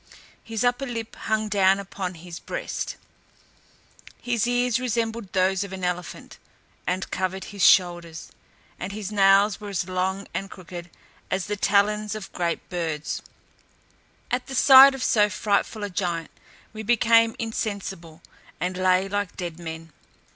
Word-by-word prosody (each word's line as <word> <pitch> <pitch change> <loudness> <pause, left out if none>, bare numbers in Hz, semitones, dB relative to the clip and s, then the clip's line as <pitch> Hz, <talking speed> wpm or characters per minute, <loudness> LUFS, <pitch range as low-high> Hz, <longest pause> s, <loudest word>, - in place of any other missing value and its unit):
His 225 -1 -3
upper 245 +2 +1
lip 230 -2 -5
hung 220 0 -1
down 195 -2 +4
upon 190 -2 -5
his 170 +1 -9
breast. - - -4 1.2
His 240 -2 0
ears 245 0 +1
resembled 230 -4 -2
those 190 0 +2
of 200 - -8
an 190 -1 -7
elephant, 180 0 -4 0.5
and 185 +2 -2
covered 190 +1 -2
his 200 -3 -2
shoulders; 175 -3 +3 0.5
and 185 +2 -5
his 210 -1 -5
nails 200 +1 +4
were 205 - -6
as 190 -2 -2
long 185 +2 -2
and 195 - -3
crooked 175 -2 -9 0.4
as 190 -1 -1
the 210 - -2
talons 210 +1 +2
of 215 -2 -7
the - - -12
greatest 170 -1 -2
birds. 160 -4 -3 1.1
At 250 +1 -1
the 270 - -5
sight 270 +1 +9
of 265 - -4
so 210 -2 +4
frightful 205 +1 -1
a 205 - -2
giant, 175 -3 -2 0.4
we 215 - -6
became 230 0 +4
insensible, 195 -7 -5 0.4
and 180 0 -2
lay 185 +1 +3
like 205 -1 -3
dead 175 -2 -5
men. 165 -1 -8
195 Hz, 145 wpm, -25 LUFS, 180-220 Hz, 1.2 s, sight